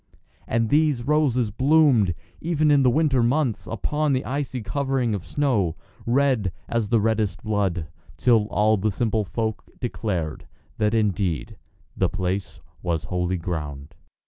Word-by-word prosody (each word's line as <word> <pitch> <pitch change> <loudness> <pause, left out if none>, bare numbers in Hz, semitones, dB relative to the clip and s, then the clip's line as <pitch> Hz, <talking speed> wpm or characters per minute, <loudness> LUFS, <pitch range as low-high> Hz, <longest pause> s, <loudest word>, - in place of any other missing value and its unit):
And 115 -1 +1
these 150 -4 +2
roses 130 -6 +2
bloomed, 130 - +4 0.2
even 155 -2 +1
in 145 -1 +5
the 130 - +5
winter 140 -1 +2
months, 120 -5 0
upon 150 +6 0
the 130 - -1
icy 135 -3 -3
covering 130 0 0
of 100 -4 -3
snow, 100 - 0 0.3
red 125 -6 +2 0.2
as 115 -3 -1
the 115 -1 +4
reddest 105 -4 0
blood, 100 -6 0 0.3
till 115 -4 +3
all 110 0 +2
the 105 +3 0
simple 110 +1 0
folk 110 +3 -3 0.2
declared 95 -10 -3 0.3
that 105 +1 +2
indeed 100 -7 0 0.4
the - - +1
place 95 +1 -3 0.2
was 85 -3 -1
Holy 90 0 -1
Ground. 75 -3 -5
110 Hz, 140 wpm, -24 LUFS, 95-135 Hz, 0.4 s, in